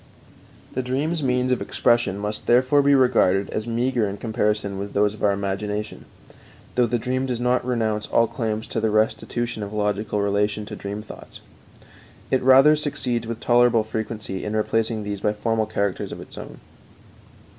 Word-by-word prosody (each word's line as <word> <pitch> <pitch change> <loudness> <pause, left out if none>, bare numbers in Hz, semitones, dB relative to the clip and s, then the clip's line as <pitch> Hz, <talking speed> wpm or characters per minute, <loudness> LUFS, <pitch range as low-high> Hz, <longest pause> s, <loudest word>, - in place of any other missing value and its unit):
The 130 - -1
dream's 145 +6 -1
means 125 -1 +1
of 125 - +1
expression 120 -5 +1
must 105 +1 -4
therefore 130 +4 +4
be 140 0 +4
regarded 100 -7 +3
as 110 +1 -3
meager 120 -2 0
in 100 - -6
comparison 105 -3 -1
with 100 +1 -6
those 105 +1 +3
of 105 - -11
our 100 - +4
imagination, 100 +2 -3 0.7
though 125 -1 +3
the 120 - 0
dream 130 +3 -2
does 125 -2 -2
not 125 +1 +1
renounce 110 -4 -1
all 115 - +3
claims 110 -2 -3
to - - -2
the 110 - +1
restitution 110 +2 -1
of 100 -1 -5
logical 105 0 -1
relation 105 +1 0
to 105 - -7
the - - -13
dream 100 +1 -5
thoughts. - - -12 0.9
It 130 - +2
rather 135 +4 +7
succeeds 125 -6 -2
with 115 0 -5
tolerable 120 -2 +4
frequency 110 -3 -5
in 105 +1 -3
replacing 110 0 0
these 100 -1 -4
by 105 - +1
formal 110 +1 -1
characters 100 -3 -2
of - - -7
its - - -11
own. - - -9
110 Hz, 175 wpm, -23 LUFS, 105-125 Hz, 0.9 s, rather